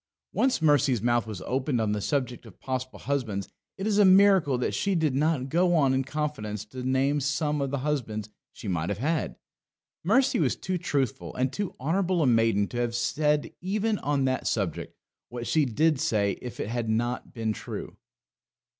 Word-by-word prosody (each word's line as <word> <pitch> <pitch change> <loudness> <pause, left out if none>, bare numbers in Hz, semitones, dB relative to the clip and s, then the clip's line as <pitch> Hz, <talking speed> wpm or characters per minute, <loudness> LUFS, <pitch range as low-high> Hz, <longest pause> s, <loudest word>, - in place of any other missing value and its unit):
Once 240 -4 +1
Mercy's 145 -5 +4
mouth 120 +1 +1
was 105 -4 -6
opened 130 0 -1
on 110 -2 +1
the 105 0 -1
subject 125 0 -2
of 100 - -16
possible 130 0 -4
husbands 120 -8 -2 0.3
it 195 - -4
is 210 -1 +2
a - - +7
miracle 190 -7 +5
that 125 - -1
she 195 -1 0
did 160 -5 +1
not 145 -1 +1
go 175 +4 +2
on 140 -5 +3
in 130 0 +1
confidence 135 -8 -3
to 125 +4 -8
name 130 +3 +1
some 150 +1 0
of 140 - -1
the 140 - -2
husbands 110 -8 -2 0.2
she - - -9
might 85 -2 -1
have 100 - -2
had. 155 +7 -1 0.7
Mercy 255 +10 +3
was 140 -6 +2
too 185 -1 -3
truthful 130 - -2
and 130 +1 0
too 205 +4 -3
honourable 175 +4 +1
a - - +3
maiden 115 -4 +3
to 120 - -7
have 120 -1 -1
said 150 +4 0
even 210 +3 0
on 140 -2 0
that 130 0 -1
subject - - -2 0.3
what 120 0 -6
she 155 +4 +2
did 150 +4 +2
say 105 -10 +1
if 125 - -8
it - - -3
had 120 -1 -2
not 120 +3 -1
been 110 -2 -2
true. - - -7
135 Hz, 190 wpm, -27 LUFS, 120-160 Hz, 0.7 s, a